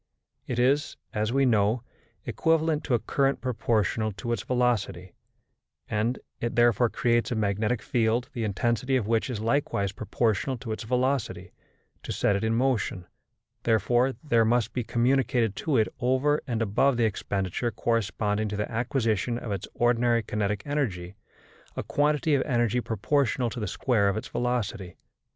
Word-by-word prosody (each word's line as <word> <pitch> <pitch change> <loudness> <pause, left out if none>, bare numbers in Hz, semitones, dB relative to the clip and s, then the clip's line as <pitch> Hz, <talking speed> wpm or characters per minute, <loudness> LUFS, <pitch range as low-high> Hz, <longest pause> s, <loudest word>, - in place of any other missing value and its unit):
It 125 - -3
is, 140 +5 +2 0.2
as 105 +1 0
we 135 +1 +3
know, 110 0 +2 0.4
equivalent 160 -1 +1
to 130 - +2
a - - +1
current 135 +4 0
proportional 110 -3 0
to 120 +5 -5
its 120 - -1
velocity, 120 -8 -1 0.7
and 110 +4 0 0.2
it 120 - -3
therefore 120 0 +4
creates 120 +1 +1
a 120 - -1
magnetic 105 +2 0
field 120 -2 +1
the 120 - -3
intensity 120 +5 0
of 125 -5 +1
which 115 +3 0
is 120 -5 -3
likewise 115 -5 0
proportional 110 +5 -1
to 115 -2 -7
its 110 - -3
velocity: 130 +2 -1 0.5
to - - -6
set 100 - +1
it 100 - -2
in 110 0 +1
motion, 115 -7 0 0.6
therefore, 120 +4 +2
there 120 -7 +3
must 120 +1 +1
be 125 - -1
communicated 120 -2 +1
to 150 -5 0
it 110 - +3
over 130 +4 +2
and 115 -3 0
above 120 +5 +2
the 120 - +3
expenditure 100 +1 -2
corresponding 110 -2 -1
to 105 - -4
the 105 - -3
acquisition 115 -1 0
of 120 -3 -6
its 100 -2 -3
ordinary 120 -1 +2
kinetic 105 -1 -2
energy, 105 -12 -2 0.6
a - - -3
quantity 145 +7 +1
of 140 - +3
energy 120 -2 +1
proportional 120 +2 0
to 120 - -5
the 105 - -2
square 110 -6 +1
of 100 - -1
its 110 - -5
velocity. 115 -7 -2
115 Hz, 160 wpm, -27 LUFS, 105-125 Hz, 0.7 s, therefore